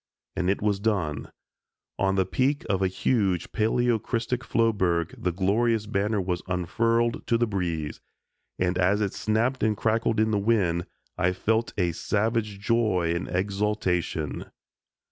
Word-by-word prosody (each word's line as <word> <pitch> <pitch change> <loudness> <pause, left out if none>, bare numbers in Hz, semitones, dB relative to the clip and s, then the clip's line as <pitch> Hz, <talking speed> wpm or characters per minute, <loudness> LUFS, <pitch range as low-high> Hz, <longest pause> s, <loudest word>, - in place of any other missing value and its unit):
and 90 0 0
it 100 - 0
was 105 -2 +1
done; 95 -9 -1 0.7
on 95 0 +2
the 95 -1 +2
peak 130 +9 0
of 95 -1 0
a 95 - +3
huge 95 -2 0
paleocrystic 120 +1 0
floeberg 95 -9 +1
the 90 - -1
glorious 105 +5 +1
banner 105 0 0
was 90 -2 -2
unfurled 115 +7 +1
to 115 - +3
the 120 - +2
breeze, 85 -8 -3 0.6
and 90 0 0
as 95 +3 +3
it 100 -2 -1
snapped 115 +5 0
and 110 -2 +1
crackled 115 +1 +1
with 110 0 +2
the 105 - +2
wind, 95 -6 +1 0.3
I 90 +1 +2
felt 110 +5 0
a 90 -3 +2
savage 105 +3 -1
joy 105 -6 +1
and 85 - -3
exultation. 95 -5 -1
100 Hz, 145 wpm, -26 LUFS, 90-115 Hz, 0.7 s, a